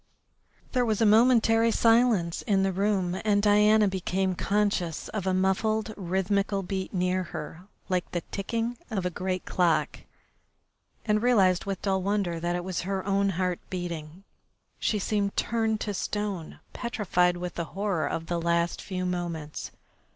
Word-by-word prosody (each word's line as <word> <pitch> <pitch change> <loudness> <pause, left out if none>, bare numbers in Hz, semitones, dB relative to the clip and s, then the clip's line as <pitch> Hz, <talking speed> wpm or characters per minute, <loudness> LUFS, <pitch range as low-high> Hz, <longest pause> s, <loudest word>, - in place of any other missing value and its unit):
There 250 -2 +2
was 220 -3 0
a 225 - +4
momentary 225 +1 +5
silence 225 -7 +3
in 195 -2 +1
the 195 - +1
room, 190 -2 0
and 205 -2 +3
Diana 210 +1 +5
became 190 0 -1
conscious 200 -4 -1
of 205 -4 -4
a 190 - +2
muffled, 215 +4 +1
rhythmical 195 +2 0
beat 190 +1 -4
near 180 0 0
her, 165 +4 -8 0.2
like 185 -2 -1
the 175 - -2
ticking 230 +4 -2
of 195 -6 -2
a 180 - 0
great 185 +1 -3
clock, 160 -4 +1 1.1
and 210 -1 +2
realised 195 -7 +3
with 195 -2 -4
dull 190 -1 +1
wonder 195 -3 -1
that 175 +1 -1
it 175 - -3
was 185 -1 -3
her 190 0 -3
own 200 0 +2
heart 180 -1 0
beating. 175 -1 -5 0.6
She 215 - +1
seemed 200 0 -1
turned 225 -2 0
to 205 - -2
stone, 200 -4 -4
petrified 185 -7 +1
with 180 0 -5
the 170 - -3
horror 195 -6 0
of 165 - -3
the 170 0 -2
last 170 0 0
few 185 -2 -4
moments. 170 -4 -4
190 Hz, 155 wpm, -27 LUFS, 180-210 Hz, 1.1 s, momentary